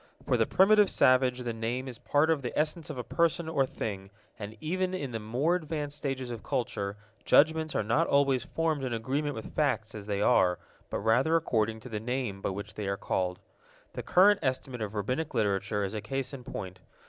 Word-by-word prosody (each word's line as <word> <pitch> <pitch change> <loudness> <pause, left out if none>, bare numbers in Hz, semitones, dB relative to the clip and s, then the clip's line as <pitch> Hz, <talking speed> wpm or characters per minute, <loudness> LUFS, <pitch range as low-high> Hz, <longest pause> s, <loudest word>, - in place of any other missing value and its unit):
For - - +2
the - - +2
primitive 205 +1 +5
savage 130 -1 +3
the 120 -1 -2
name 120 +4 -3
is 125 -3 -8
part 150 +3 +2
of 155 -3 +1
the 125 - -5
essence 155 +1 0
of 150 - -5
a 125 - -3
person 170 +4 0
or 140 -5 +1
thing, 100 -5 -5 0.3
and 105 +1 -7
even 185 +3 -1
in 140 -8 -4
the 115 - -3
more 125 +10 0
advanced 155 -4 -3
stages 135 -4 -3
of 115 -2 -6
culture, 105 -7 -2 0.3
judgments 160 +1 +4
are - - +1
not 120 +11 +2
always 140 -2 +3
formed 160 -4 -1
in 125 -2 -2
agreement 140 +6 -2
with 110 - -8
facts 130 -7 0
as 105 -1 -8
they 100 -1 -1
are, 90 -3 +4 0.3
but - - -2
rather 125 +9 +2
according 110 -8 0
to 125 - -9
the 110 -2 -3
names 120 -4 -3
by - - -1
which 100 +2 -6
they 105 -2 -4
are 100 0 -1
called. 90 -2 -1 0.6
The - - -4
current 195 +3 +5
estimate 130 -3 -2
of 105 0 -4
Rabbinic 125 +8 -2
Literature 105 -1 0
is 100 +1 -3
a 105 - -3
case 135 +5 -3
in 130 -2 -7
point. 95 -2 -6
130 Hz, 205 wpm, -29 LUFS, 110-150 Hz, 0.6 s, primitive